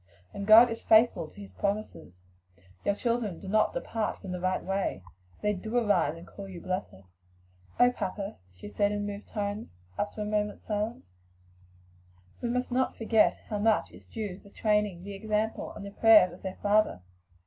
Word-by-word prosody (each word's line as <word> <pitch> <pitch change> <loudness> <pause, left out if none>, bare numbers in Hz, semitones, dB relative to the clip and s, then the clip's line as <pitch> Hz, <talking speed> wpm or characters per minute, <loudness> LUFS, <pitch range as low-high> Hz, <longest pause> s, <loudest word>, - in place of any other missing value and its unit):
And 200 0 -5
God 230 +2 +9
is 230 - -5
faithful 220 -7 +4
to - - -16
his 200 - -10
promises 200 - -3 0.7
your 200 - +1
children 230 -6 -1
do 195 - -10
not 215 +2 +2
depart 230 - -2
from 190 - -7
the 180 - -3
right 185 +1 -1
way; 195 - -2 0.4
they 210 0 +2
do 220 +5 -3
arise 205 -9 +2
and 170 - -11
call 200 -1 -10
you 180 -2 -8
blessed." 185 - -4 0.7
"Papa," 210 -5 +1
she 90 +2 -11
said, 205 - +1
in 205 0 -2
moved 205 0 -6
tones, 205 - -4 0.2
after 210 +1 -2
a - - -4
moment's 210 0 -1
silence, 210 - -3 1.3
"we 240 - -1
must 250 +1 -1
not 260 +1 0
forget 225 -1 +3
how 210 - -2
much 220 +1 +2
is - - -16
due 210 -5 -5
to - - -18
the 200 - -16
training, 210 -4 0
the 200 +1 -7
example, 215 +2 -2
and 200 - -8
the 200 - -7
prayers 210 -4 +6
of 175 - -13
their 190 -1 -6
father." 205 - +2
205 Hz, 180 wpm, -29 LUFS, 195-220 Hz, 1.3 s, God